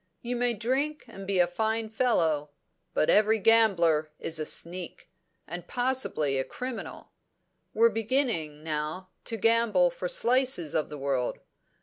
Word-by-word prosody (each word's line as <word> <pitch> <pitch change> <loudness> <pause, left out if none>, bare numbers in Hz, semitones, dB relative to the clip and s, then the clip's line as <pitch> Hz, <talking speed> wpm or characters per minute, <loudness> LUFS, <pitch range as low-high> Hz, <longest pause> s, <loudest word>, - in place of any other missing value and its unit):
You 245 +1 -2
may 245 -1 +1
drink 270 +7 -1
and 195 -5 -10
be 195 -1 0
a 175 - +5
fine 220 +5 -1
fellow; 165 - +1 0.5
but 155 - +2
every 215 +1 +4
gambler 185 -9 +4
is 160 -1 -3
a 155 - -3
sneak, 175 0 -5 0.4
and 175 +2 -7
possibly 245 - 0
a - - +1
criminal. 250 - -7 0.6
We're 230 +1 +5
beginning, 220 - 0
now, 155 +4 -4 0.2
to 225 - -2
gamble 220 -5 +3
for 180 +1 -4
slices 245 - +2
of 155 - 0
the 150 - -7
world. 135 -3 -1
195 Hz, 140 wpm, -28 LUFS, 160-235 Hz, 0.6 s, a